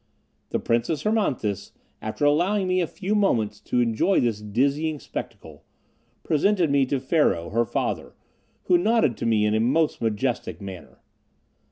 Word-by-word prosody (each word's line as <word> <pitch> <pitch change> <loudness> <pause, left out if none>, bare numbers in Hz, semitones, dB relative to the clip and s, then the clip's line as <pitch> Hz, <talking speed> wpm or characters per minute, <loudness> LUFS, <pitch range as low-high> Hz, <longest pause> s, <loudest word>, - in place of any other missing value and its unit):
The - - 0
Princess 120 +6 -1
Hermonthis, 140 - -1 0.3
after 110 +7 -2
allowing 185 +7 +2
me 185 0 +2
a 170 - 0
few 200 +4 -3
moments 110 - +1
to 125 - 0
enjoy 120 - +2
this 115 -3 0
dizzying 140 +9 0
spectacle, - - -8 0.6
presented 170 +1 +2
me 140 -2 +3
to 135 +1 0
Pharaoh, 130 - +1
her 115 +2 +2
father, - - -3 0.5
who 175 -1 +3
nodded 215 - +2
to - - -2
me 110 -2 +3
in 105 - +1
a 110 - +2
most 145 +7 +1
majestic 115 +2 -2
manner. 95 -3 -9
135 Hz, 150 wpm, -24 LUFS, 110-175 Hz, 0.6 s, me